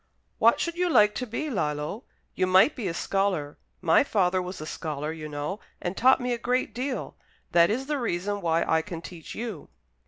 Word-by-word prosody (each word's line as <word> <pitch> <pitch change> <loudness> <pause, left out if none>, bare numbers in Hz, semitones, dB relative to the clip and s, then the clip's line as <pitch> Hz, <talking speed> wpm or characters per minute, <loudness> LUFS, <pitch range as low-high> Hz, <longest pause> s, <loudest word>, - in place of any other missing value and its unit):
"What - - +5
should 340 - -1
you 360 0 +1
like 210 -9 +5
to 250 - -4
be, 290 +7 -3
Lillo? 150 - -2 0.3
You 185 - +1
might 190 +9 +5
be 230 -7 -3
a 170 - -2
scholar. 185 -8 -1 0.2
My 165 +4 +5
father 185 -7 +1
was 180 +1 -6
a 155 - -6
scholar, 150 -1 -4
you 155 -1 -7
know, 150 +7 -4 0.2
and 175 +1 -3
taught 260 +5 +5
me 250 -1 -1
a 235 - -3
great 250 -1 0
deal. 255 +3 -3 0.4
That 170 0 +5
is 250 +5 -1
the 295 0 -1
reason 205 -2 -2
why 165 -1 +2
I 160 0 +2
can 165 0 -7
teach 170 -3 -9
you." 220 -9 -6
190 Hz, 200 wpm, -27 LUFS, 165-240 Hz, 0.4 s, What